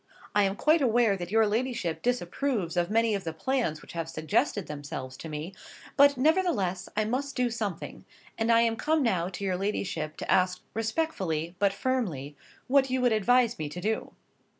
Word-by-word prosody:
I 205 -1 +4
am 195 0 -1
quite 310 +7 +3
aware 235 -4 +3
that 175 -2 -6
your 220 +2 +4
ladyship 215 -6 -1
disapproves 245 -4 -1
of 175 0 +1
many 225 +1 +2
of 200 -2 -2
the 160 - -4
plans 170 - -1
which - - -12
have 165 -1 -3
suggested 155 -1 0
themselves 140 -3 -6
to 160 - -8
me; 155 +5 -5 0.4
but 280 -1 +6
nevertheless 255 - +1
I 215 - +2
must 270 +5 -2
do 250 -2 +1
something, 210 -7 -5 0.3
and 225 +1 +1
I 230 0 +6
am 230 -1 +1
come 310 +2 +1
now 185 -7 +1
to 195 +1 -7
your 185 -2 0
ladyship 175 -6 -3
to - - -3
ask 180 0 +2
respectfully, 195 - -2
but 200 0 +3
firmly, 195 - -2 0.3
what 270 0 +3
you 260 0 0
would 245 -2 +3
advise 235 +1 +3
me 150 -2 -3
to 170 - -7
do." 220 +4 -2
210 Hz, 185 wpm, -28 LUFS, 175-250 Hz, 0.4 s, but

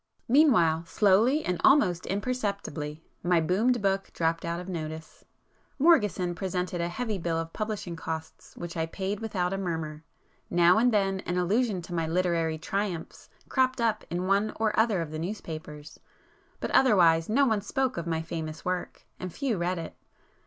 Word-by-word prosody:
Meanwhile, 180 - +4
slowly 220 - +3
and 180 -1 -1
almost 185 - +4
imperceptibly, 200 - -3 0.2
my 175 -1 +3
'boomed' 205 +8 +1
book 195 0 0
dropped 165 0 0
out 170 0 -2
of 180 - -8
notice. 160 -3 -6 0.5
Morgeson 210 - +3
presented 180 0 -2
a 170 - -1
heavy 215 +1 -3
bill 165 -1 -1
of 165 0 -4
publishing 210 -5 -4
costs 160 -1 -7
which 175 -1 -6
I 165 -1 -1
paid 195 +4 -3
without 195 -5 -1
a 195 - -2
murmur; 160 -4 -4 0.5
now 175 +3 +5
and 245 +2 +4
then 195 -3 +1
an 175 - -1
allusion 195 +1 +1
to 175 - -8
my 165 -2 -1
'literary 165 -2 0
triumphs' 180 0 -4 0.2
cropped 260 -1 +1
up 225 -2 +1
in 175 +2 -2
one 200 +3 +2
or 220 -1 +1
other 220 -5 +2
of 160 -2 -5
the 155 - -4
newspapers, 160 -5 -7 0.6
but - - -3
otherwise 170 -9 +5
no 275 +6 +4
one 220 -5 +1
spoke 260 +5 -1
of 170 0 -4
my 160 -1 -1
'famous' 160 -1 -6
work, 180 0 -3
and 185 -1 -5
few 245 - -2
read 180 +1 0
it. 165 - -6
180 Hz, 165 wpm, -28 LUFS, 165-215 Hz, 0.6 s, now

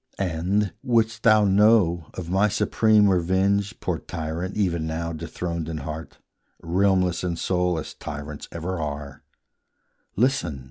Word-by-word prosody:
And, 95 +3 0
wouldst 115 -3 +1
thou 110 -2 +5
know 95 -5 +4
of 90 -3 -6
my 95 +4 +3
supreme 105 +1 +3
revenge 95 +2 +1
Poor - - -2
tyrant, 85 +4 -5
even 85 -6 0
now 85 +1 -3
dethroned 85 +1 -4
in 80 - -4
heart, 75 0 -7 0.4
Realmless 90 0 +1
in 90 -2 -1
soul, 90 0 0
as 80 - -6
tyrants 75 0 -7
ever 85 +2 -4
are, 70 -2 -5 0.9
Listen! 110 - +1
90 Hz, 130 wpm, -24 LUFS, 80-100 Hz, 0.9 s, thou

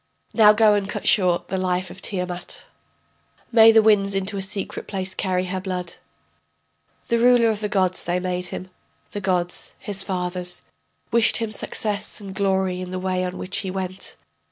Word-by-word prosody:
Now 215 -2 +7
go 210 0 +5
and 200 -1 0
cut - - -4
short 180 -4 +3
the 190 - -1
life 185 0 -1
of 195 - -11
Tiamat, 180 -3 -3 0.9
May 225 -1 +8
the 220 -1 +6
winds 200 -2 +3
into 195 +1 -1
a 195 - -2
secret 195 0 -3
place 190 -1 -3
carry 185 -1 -1
her 185 0 -3
blood. 180 -2 -4 1.1
The 235 - +2
ruler 240 -1 +5
of 215 - -4
the 210 -1 -3
gods 185 -2 +1
they 175 +1 0
made 180 0 -3
him, 185 +1 -7 0.4
the 205 - -5
gods, 180 -2 -1
his 200 -1 -3
fathers, 180 -2 -2 0.5
Wished 230 -1 +4
him 225 -2 -3
success 210 0 -3
and 195 -2 -8
glory 190 -2 0
in 180 - -6
the 185 - -4
way 185 0 -1
on 180 0 -4
which 185 +2 -4
he 195 - -4
went. 185 0 -5
190 Hz, 180 wpm, -23 LUFS, 185-205 Hz, 1.1 s, May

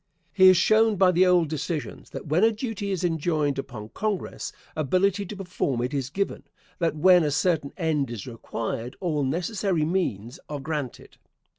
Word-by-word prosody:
He 190 -2 +7
has 185 -1 +7
shown 220 +2 +4
by 185 -1 +5
the 180 +1 +4
old 175 -3 +4
decisions, 155 +1 -4
that - - -7
when 160 +6 +2
a 225 - +6
duty 215 -3 -4
is 190 -3 -2
enjoined 155 -4 0
upon 110 -5 -7
Congress, 210 - -3 0.2
ability 185 +6 +1
to 210 - -7
perform 175 -10 -2
it 125 +4 -3
is 135 -2 -2
given; 195 +7 -2 0.4
that 165 -3 0
when 180 +2 +6
a 150 - +1
certain 145 0 0
end 155 -7 0
is 115 -5 -6
required, 115 0 -5
all 160 -5 -1
necessary 175 +3 0
means 140 - -2
are 145 -1 -4
granted. 145 -3 -5
165 Hz, 170 wpm, -25 LUFS, 140-190 Hz, 0.4 s, He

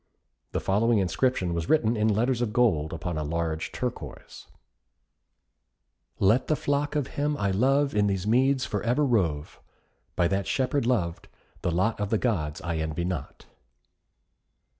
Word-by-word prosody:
The - - -1
following 110 +4 +2
inscription 95 0 0
was 85 -1 -3
written 120 -7 +3
in 105 0 +1
letters 115 +4 +1
of 120 -3 0
gold 105 -11 +2
upon 80 0 -4
a - - -2
large 80 +1 -2
turquoise: - - -6 1.7
Let 110 +7 +3
the 155 - +2
flock 145 +1 -1
of 145 -3 +1
him 145 +2 -2
I 100 -1 0
love 135 +8 +2
In 105 -1 +2
these 95 -1 -1
meads 130 +4 +2
for 105 -5 -3
ever 125 +5 +1
rove. 85 - -1 0.5
By 85 - +3
that 100 0 -1
Shepherd 130 -1 0
loved, 90 -10 -1 0.3
the - - 0
lot 95 +7 0
Of 105 -1 -2
the 110 - +2
Gods 85 -11 -1
I 85 -2 -2
envy 80 +2 -2
not. 85 -6 -5
105 Hz, 155 wpm, -27 LUFS, 85-125 Hz, 1.7 s, written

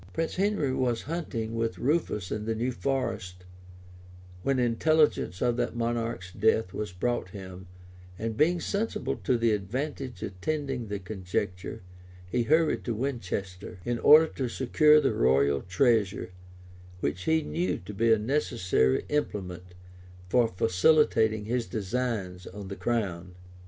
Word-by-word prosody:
Prince 165 +2 -2
Henry 195 -9 +1
was 125 -3 0
hunting 130 -9 -4
with 115 0 -1
Rufus 125 - 0
in 105 0 -3
the 115 0 -1
new 120 +3 -1
forest, 95 -9 -3 1.0
when 135 +6 +1
intelligence 125 - +2
of 120 -1 +1
that - - -1
monarch's 115 -5 -2
death 110 -1 +1
was 105 -3 -4
brought 90 +1 -2
him, 95 -1 -9 0.5
and 110 +1 -3
being 170 +7 +3
sensible 205 +6 -2
of 125 - +3
the 115 -1 +3
advantage 125 +3 -3
attending 130 +5 -3
the 100 0 -3
conjuncture 90 -2 -4 0.4
he 120 +7 0
hurried 155 +6 +2
to 120 - -1
Winchester, 100 -8 -4
in 120 -1 -1
order 155 +5 +8
to 130 -5 -4
secure 150 +5 +4
the 135 -6 +1
royal 70 -5 +3
treasure, 100 -2 +1 0.7
which 85 +3 -2
he 160 0 +2
knew 175 +4 -1
to 90 +4 -9
be 115 +3 +2
a 110 - +6
necessary 105 - +1
implement 90 -11 -3 0.5
for 120 +3 +4
facilitating 110 - +3
his 120 +1 -1
designs 105 -4 -3
on 100 0 -8
the 100 - -5
crown. 95 -7 -2
115 Hz, 135 wpm, -28 LUFS, 95-135 Hz, 1.0 s, order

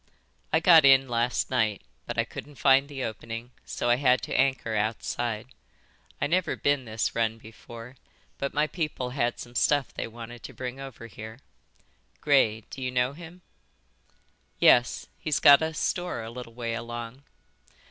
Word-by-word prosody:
"I 160 - +4
got 165 -2 +7
in 135 -1 +6
last 120 +1 0
night, 110 -6 0 0.2
but - - -4
I - - +3
couldn't 145 0 -10
find 135 +1 +4
the 135 -2 -5
opening, 115 +2 -6 0.2
so - - -3
I 120 - +4
had 130 -2 +3
to - - -4
anchor 130 -4 +1
outside. 110 +2 -2 0.7
I - - +1
never 175 +4 +1
been 145 -2 0
this 110 -1 -2
run 115 -1 0
before, 115 +3 -12 0.4
but 140 - -2
my 150 +1 +1
people 150 -6 -3
had 120 -2 -1
some 120 - -9
stuff 140 +3 +1
they - - -4
wanted 120 +1 -10
to - - -9
bring 130 +1 -6
over 135 -4 -9
here. 110 0 -9 0.8
Gray, 125 -7 +3
d'you 130 -1 -4
know 125 +1 0
him?" 170 +3 -12 1.1
"Yes, 120 0 +4
he's 155 -3 0
got 140 +1 +8
a 160 0 -1
store 175 -3 -2
a 110 - -7
little 115 -1 -9
way 115 -1 -3
along." 120 +2 -6
125 Hz, 160 wpm, -27 LUFS, 115-140 Hz, 1.1 s, got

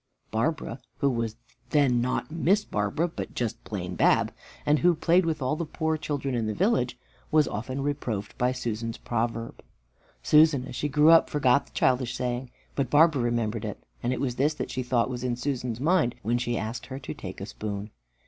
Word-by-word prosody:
Barbara, 130 +2 -1 0.2
who 140 - +2
was 115 -2 -2 0.3
then 135 -5 +3
not 125 +5 -1
Miss 180 +6 +2
Barbara, 105 +11 0
but 170 - -7 0.3
plain 90 -4 -4
Bab, - - +3 0.3
and 150 0 +4
who 175 0 +4
played 170 +2 +3
with 155 -4 -1
all 130 +4 +1
the 170 - -2
poor 160 0 -1
children 145 -3 -3
in 115 -3 0
the 110 - -2
village, 125 - +1 0.3
was 155 -1 +4
often 130 +6 -3
reproved 125 -8 -3
by 125 +1 +3
Susan's 115 -2 -3
proverb. 115 0 -3 0.6
Susan, 150 -4 +5
as - - -8
she 145 - -1
grew 150 +3 +6
up, 165 - +6
forgot 140 -2 +3
the - - -21
childish 125 -1 +1
saying, 125 0 -2 0.2
but 135 -4 -1
Barbara 150 -1 +5
remembered 120 -2 -1
it, - - -5 0.2
and 120 - 0
it 130 - -1
was 125 -3 -2
this 150 +3 +2
that - - -4
she 130 - -2
thought 125 -2 +1
was 125 -1 -5
in 125 -1 0
Susan's 125 -2 -3
mind 155 -4 +2
when 120 +4 +1
she 120 -1 -1
asked 110 +3 -4
her 130 +1 -6
to 130 - -6
take 95 -1 -8
a 100 - -4
spoon. 105 0 -5
125 Hz, 195 wpm, -27 LUFS, 115-150 Hz, 0.6 s, grew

